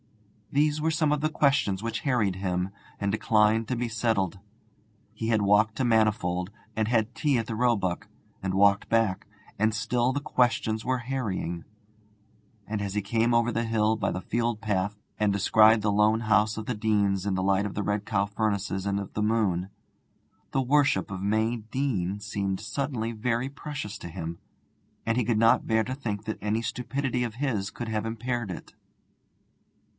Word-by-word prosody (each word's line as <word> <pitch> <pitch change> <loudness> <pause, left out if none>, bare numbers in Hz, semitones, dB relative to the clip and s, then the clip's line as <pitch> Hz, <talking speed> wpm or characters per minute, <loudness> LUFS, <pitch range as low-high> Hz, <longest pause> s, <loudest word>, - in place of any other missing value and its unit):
These 150 +1 +2
were 160 +1 +1
some 155 -2 +1
of 150 - -1
the 155 - +1
questions 140 -11 +2
which 115 0 -2
harried 110 -9 +1
him 90 0 -1 0.3
and 100 0 0
declined 110 +1 +3
to 125 - -1
be 120 0 -1
settled. 110 -5 0 0.7
He 110 +1 -4
had 110 -2 +2
walked 105 +2 +4
to 130 - 0
Manifold, 105 -6 +2 0.3
and 110 -1 0
had 115 0 +1
tea 145 -3 +1
at 115 - -1
the 110 - -4
Roebuck, 110 -7 0 0.4
and 95 -1 -1
walked 100 +1 +4
back, 110 -4 +1 0.3
and 110 +1 +3
still 120 +4 +1
the 140 - -1
questions 120 -6 +1
were 130 +2 0
harrying; 110 -10 -3 1.0
and 105 -1 -3
as 100 0 -3
he 105 - +1
came 115 +4 +1
over 115 0 +3
the 115 +1 -1
hill 110 -1 +2
by 105 -2 -1
the 90 - -3
field 115 +2 -1
path, 105 -2 -1 0.2
and 105 -1 +3
descried 110 +2 +5
the 105 - +2
lone 105 +2 +3
house 110 -1 +2
of 110 - -4
the 125 - -2
Deanes 100 -2 +1
in 95 - +1
the 95 - -1
light 100 +1 +2
of 100 - -8
the 105 - -1
Red 105 0 -1
Cow 100 -1 +1
furnaces 100 -2 -1
and 100 0 0
of 100 - -7
the 105 - -2
moon, 100 -5 +1 0.8
the 135 - +1
worship 140 -4 +2
of 95 -1 -5
May 110 +4 +1
Deane 110 -5 -2
seemed 100 -2 -2
suddenly 115 0 -3
very 115 +3 -1
precious 145 -7 -6
to 85 - -7
him, 85 -1 -6 0.7
and 115 - +1
he 125 - +2
could 110 0 +1
not 115 +1 +4
bear 110 0 +3
to 125 +4 -4
think 110 -6 -4
that 110 - -4
any 105 +2 0
stupidity 125 +1 -2
of 115 -3 -4
his 120 -7 -1
should 120 - -4
have 110 -1 -2
impaired 120 0 -3
it. 90 - -8
110 Hz, 185 wpm, -27 LUFS, 100-120 Hz, 1.0 s, descried